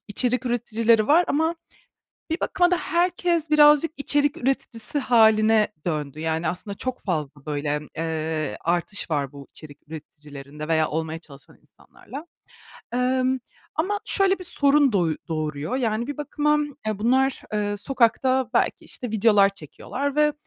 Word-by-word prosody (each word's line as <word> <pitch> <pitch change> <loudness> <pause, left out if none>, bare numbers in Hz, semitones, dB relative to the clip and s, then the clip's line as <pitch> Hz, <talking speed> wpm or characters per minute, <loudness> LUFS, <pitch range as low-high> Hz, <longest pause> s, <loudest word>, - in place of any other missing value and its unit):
içerik 250 +4 -1
üreticileri 230 -2 +2
var 335 +4 +5
ama 320 +3 +1 0.7
bir 325 - -2
bakıma 355 -1 +2
da 360 - +3
herkes 345 -2 0
birazcık 300 +1 +5
içerik 290 0 +1
üreticisi 260 0 0
hâline 220 -3 +4 0.2
döndü. 150 -2 -3
Yani, 160 +1 -1
aslında 200 +3 -5
çok 255 +2 -4
fazla, 150 -6 -4
böyle, 145 -1 -3
emm, 150 0 -5
eee, 160 -5 -2
artış 175 +2 -2
var 140 -3 -1
bu 140 -1 -11
içerik 150 -3 -13
üreticilerinde 150 -1 -10
veya 160 -1 +2
olmaya 160 +1 -3
çalışan 140 -4 -16
insanlarla. 290 +5 -12 0.7
Emm, 255 +1 +1 0.4
ama 405 +6 -1
şöyle 390 -3 +3
bir 365 - -8
sorun 285 -5 +3
doy 170 -5 +1
doğuruyor, 155 - -3
yani, 235 -2 -1
bir 290 - -5
bakıma, 300 +1 0 0.3
eee, 215 -2 -2
bunlar, 260 +4 +1
eee, 205 -1 -1
sokakta 255 +2 +1
belki, - - +1
işte, 245 -3 -6
videolar 210 -2 +4
çekiyorlar 250 - -5
ve 300 0 +4
225 Hz, 140 wpm, -24 LUFS, -, 0.7 s, var